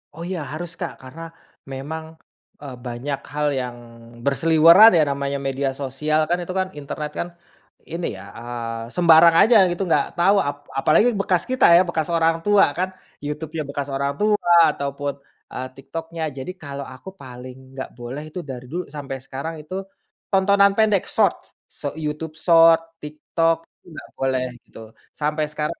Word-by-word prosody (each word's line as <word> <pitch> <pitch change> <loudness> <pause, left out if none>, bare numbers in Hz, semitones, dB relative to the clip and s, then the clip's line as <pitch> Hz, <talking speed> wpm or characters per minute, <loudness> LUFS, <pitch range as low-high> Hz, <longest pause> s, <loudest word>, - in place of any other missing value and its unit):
Oh, 165 - -8
iya, 180 -4 -3
harus, 170 +2 -5
Kak. 175 -5 -5
Karena 130 +5 -11 0.5
memang, 150 +4 -5 0.6
eee, 140 -3 -8
banyak 130 +3 -4
hal 150 0 0
yang 125 -2 -3 0.5
berseliweran 165 - +7
ya, 160 - +5
namanya 140 0 -2
media 135 0 -1
sosial 140 +3 -1
kan, 175 - +2
itu 175 - -6
kan 185 - 0
internet 150 +1 -5
kan, 175 - -2 0.6
ini 170 +1 -3
ya, - - -10 0.2
eee, 115 -1 -6
sembarang 170 -1 +6
aja 225 +1 +6
gitu 175 - -4
nggak - - +3
tau 195 +4 +5
ap 145 0 -3 0.2
apalagi 210 - +3
bekas 180 -3 +1
kita 255 - +4
ya, 175 - +7
bekas 160 -2 -1
orang 165 -1 +3
tua 205 -1 +5
kan. 185 +1 0 0.3
YouTube-nya 155 +2 -4
bekas 140 0 -4
orang 140 +1 -1
tua, 205 -4 +3 0.2
ataupun, 140 0 -3 0.4
eee, 130 - -4
TikTok-nya. 165 +4 -6
Jadi, 135 +7 -5
kalau 140 -2 -6
aku 130 +5 -10
paling 125 -1 -10 0.2
nggak 130 0 -6
boleh 125 +5 -6
itu 155 +4 -7
dari 130 -3 -8
dulu 180 +2 -3
sampai 140 -2 -5
sekarang 140 +5 -5
itu 155 +5 -7 0.6
tontonan 200 +1 +4
pendek, 210 -4 +3
Short. - - +2 0.4
Sho - - -6
YouTube 155 0 -5
Short, 165 0 +6 0.2
TikTok, 155 +2 0 0.2
itu - - -27
nggak - - -10
boleh, 130 -1 0 0.2
gitu. - - -14 0.4
Sampai 150 +1 0
sekarang 150 0 -3
150 Hz, 160 wpm, -22 LUFS, 135-170 Hz, 0.6 s, berseliweran